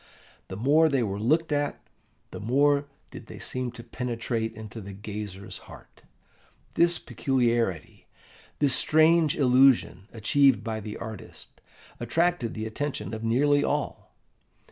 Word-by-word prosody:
The 95 - -7
more 150 +8 +4
they 135 -4 +1
were 100 -2 -3
looked 155 +9 +1
at, 145 -1 -1 0.5
the - - -7
more 140 +5 +2 0.2
did - - -10
they - - -10
seem 125 -1 -4
to 120 -1 -10
penetrate 115 -1 -3
into 110 +1 -8
the 100 0 -9
gazer's 100 -1 -7
heart. - - -15 0.7
This 170 0 +3
peculiarity, 120 - -1 0.5
this 145 -3 +2
strange 160 +1 +4
illusion 130 -7 +4
achieved 130 +4 +3
by 110 -1 -3
the 105 0 -7
artist, 110 -3 -10 0.4
attracted 165 +1 0
the 110 0 -4
attention 110 -2 -4
of 110 0 -5
nearly 145 +5 +3
all. 145 0 -3
120 Hz, 130 wpm, -26 LUFS, 110-145 Hz, 0.7 s, more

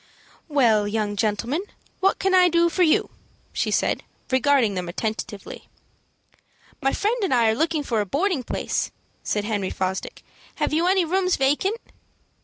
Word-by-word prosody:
"Well, 235 -9 +3
young 205 -1 -1
gentleman, 225 - -1 0.4
what 390 0 +2
can 385 0 0
I 365 -1 +6
do 340 0 +3
for 365 - -2
you?" 375 +6 +3 0.4
she - - -1
said, - - +1 0.3
regarding 260 -4 +3
them 180 -2 -4
attentively. 215 +2 -5 1.1
"My 270 -1 +2
friend 430 +4 0
and 385 - 0
I 235 -3 +4
are - - -1
looking 315 +2 0
for 230 -6 0
a - - -2
boarding 320 - 0
place," - - -2 0.3
said 210 -1 -1
Henry 205 -3 -1
Fosdick. 190 0 -4 0.3
"Have - - -1
you 330 +3 +2
any 375 -1 +3
rooms 365 +2 +1
vacant?" 295 +11 +1
270 Hz, 155 wpm, -23 LUFS, 215-355 Hz, 1.1 s, I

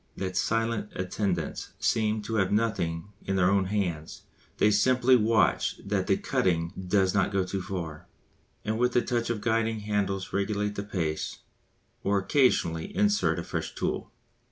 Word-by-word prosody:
The 95 -1 -3
silent 115 +2 0
attendants 95 +1 -2
seem 110 -1 +1
to 110 +1 -2
have 95 -3 +2
nothing 105 -5 0
in 95 - -1
their 95 0 +3
own 100 -1 +3
hands, 90 -6 -3 0.3
they 105 - +4
simply 125 +4 +4
watch 115 -1 +2
that - - -1
the - - +3
cutting 85 -2 0
does 95 -1 +3
not 95 -2 +2
go 100 -1 +1
too 95 +1 -3
far, 85 -5 -6 0.6
and 110 +1 -1
with 125 0 +2
a 120 - +5
touch 120 -2 -1
of 115 -3 -2
the - - -12
guiding 115 -1 +1
handles 100 -2 -2
regulate 105 +1 0
the 100 - -3
pace 85 -7 -3 0.6
or 100 0 +2
occasionally 95 - +2
insert 205 0 +2
a - - -3
fresh - - -4
tool. - - -2
100 Hz, 160 wpm, -28 LUFS, 95-110 Hz, 0.6 s, a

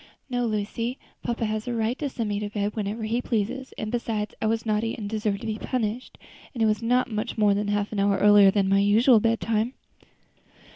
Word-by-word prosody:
"No, 245 -1 0
Lucy, 225 +4 -2 0.2
papa 235 -1 -2
has 215 +1 -3
a 240 - -2
right 225 +2 0
to 290 - -2
send 230 -4 -3
me 205 0 -1
to 210 0 -4
bed 205 0 -2
whenever 215 +1 -3
he 230 +3 0
pleases; 240 +3 -2
and 215 0 -4
besides, 225 -3 -2
I 220 - +1
was 225 0 0
naughty 220 +1 0
and 210 -3 -5
deserved 210 -1 -2
to - - -7
be 215 -1 -3
punished; 240 -1 -3 0.4
and 230 - 0
it - - +5
was 215 0 +1
not 245 +1 +1
much 220 +3 -3
more 210 -2 +4
than 205 +1 -1
half 205 0 -1
an 210 - -2
hour 200 0 +2
earlier 205 -1 +7
than 195 0 +1
my 195 +1 +3
usual 220 +4 +5
bedtime." 225 +1 0
215 Hz, 220 wpm, -25 LUFS, 205-230 Hz, 0.4 s, earlier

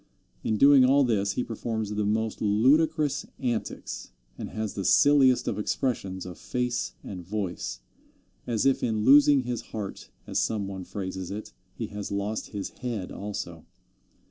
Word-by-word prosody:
In 110 - 0
doing 140 +2 +7
all 140 +2 +5
this 105 -5 +1
he 125 - -1
performs 110 -2 -3
the 105 0 0
most 110 +1 -1
ludicrous 145 +8 +3
antics, 115 - -3 0.3
and - - -6
has 110 -2 -3
the 100 - -3
silliest 130 +7 +5
of - - -1
expressions 105 -5 -2
of 90 +1 -9
face 125 -1 -2
and 90 -3 -7
voice, 90 - -4 0.7
as 115 -2 0
if 135 -1 +3
in 110 -2 0
losing 145 0 +7
his 120 -2 -3
heart, 105 -3 -7 0.2
as - - -1
some 105 -3 0
one 95 -2 -6
phrases 95 -2 -5
it, 105 +2 -6 0.2
he - - -3
has 105 0 -5
lost 100 +2 -2
his 100 -2 -5
head 115 -7 -4
also. 85 -5 -6
110 Hz, 155 wpm, -27 LUFS, 100-125 Hz, 0.7 s, doing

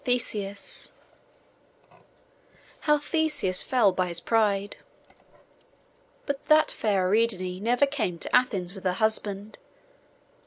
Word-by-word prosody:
PART 245 -1 +1
IV 200 -1 -6 1.9
HOW 300 0 +2
THESEUS 295 - +1
FELL 235 -7 +2
BY 185 0 -1
HIS 170 -1 -1
PRIDE 205 -3 0 1.5
But 280 -1 -4
that 310 0 +4
fair 195 -4 0
Ariadne 185 -3 0
never 240 +6 +2
came 235 -11 -3
to - - -1
Athens 195 -8 +1
with 195 -2 -12
her 180 - +1
husband. 210 -1 0
210 Hz, 110 wpm, -26 LUFS, 190-250 Hz, 1.9 s, that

